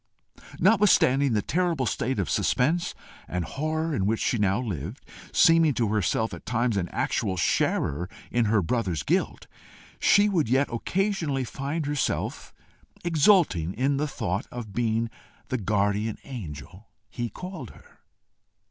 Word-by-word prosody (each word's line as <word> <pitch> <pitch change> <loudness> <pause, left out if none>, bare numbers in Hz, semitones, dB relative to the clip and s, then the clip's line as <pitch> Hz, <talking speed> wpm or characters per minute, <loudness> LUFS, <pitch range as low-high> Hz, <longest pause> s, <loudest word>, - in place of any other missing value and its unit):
Notwithstanding 170 - +4
the 105 -2 +1
terrible 170 -4 0
state 120 +3 -1
of 95 -5 -1
suspense 155 - +1 0.3
and 90 -1 -2
horror 155 - -2
in 95 -8 0
which 110 +1 +1
she 120 - 0
now 100 +1 +2
lived, 100 - -5 0.3
seeming 165 -4 +5
to 115 -3 +1
herself 110 +2 0
at - - -8
times 120 -1 0
an 90 -3 -1
actual 95 -1 -1
sharer 85 0 0 0.2
in 120 -1 +2
her 105 -2 +2
brother's 90 - -1
guilt, - - -1 0.5
she 205 +1 +5
would 170 - +1
yet 135 +3 +2
occasionally 165 - -1
find 140 +5 -3
herself 145 -1 -2 0.5
exulting 155 - +3
in 135 +4 +1
the 150 +2 0
thought 95 -8 -3
of 115 -5 -7
being 115 -1 0 0.4
the 130 - -1
guardian 105 +1 0
angel 90 - -9 0.2
he 120 +2 -4
called 180 - -8
her. - - -18
120 Hz, 140 wpm, -26 LUFS, 100-150 Hz, 0.5 s, seeming